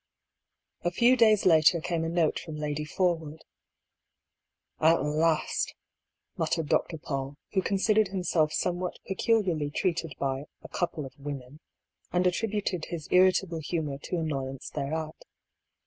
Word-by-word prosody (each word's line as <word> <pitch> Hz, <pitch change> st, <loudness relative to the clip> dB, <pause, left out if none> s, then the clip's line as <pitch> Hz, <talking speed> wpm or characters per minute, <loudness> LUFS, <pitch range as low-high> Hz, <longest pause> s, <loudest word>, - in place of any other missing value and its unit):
A 175 Hz, -, +2 dB
few 235 Hz, +8 st, +4 dB
days 220 Hz, -4 st, +4 dB
later 165 Hz, -1 st, +6 dB
came 165 Hz, 0 st, -2 dB
a 165 Hz, -, -1 dB
note 165 Hz, -2 st, +1 dB
from 155 Hz, -, -8 dB
Lady 150 Hz, 0 st, -3 dB
Forwood. 160 Hz, -2 st, -1 dB, 0.7 s
" -, -, -55 dB
At 165 Hz, -, +2 dB
last," 155 Hz, +2 st, +1 dB, 0.6 s
muttered 160 Hz, -3 st, -1 dB
Dr. 165 Hz, -, +1 dB
Paull, 140 Hz, -2 st, -4 dB, 0.2 s
who 190 Hz, -, +3 dB
considered 210 Hz, +2 st, +2 dB
him 190 Hz, -1 st, -3 dB
self 155 Hz, -3 st, +2 dB
somewhat 180 Hz, +2 st, -1 dB
peculiarly 190 Hz, -7 st, +1 dB
treated 165 Hz, -2 st, -1 dB
by 135 Hz, +1 st, -2 dB
" -, -, -54 dB
a -, -, -8 dB
con 175 Hz, -, 0 dB
pie 155 Hz, -, -7 dB
of 135 Hz, +2 st, -12 dB
women," 140 Hz, 0 st, -7 dB, 0.5 s
and 180 Hz, +1 st, +2 dB
attributed 195 Hz, -2 st, 0 dB
his 165 Hz, -4 st, -6 dB
irritable 180 Hz, -2 st, +4 dB
humour 150 Hz, -3 st, -3 dB
to 180 Hz, -, -4 dB
annoyance 135 Hz, -5 st, -3 dB
thereat. 155 Hz, +2 st, -4 dB
165 Hz, 145 wpm, -28 LUFS, 150-180 Hz, 0.7 s, later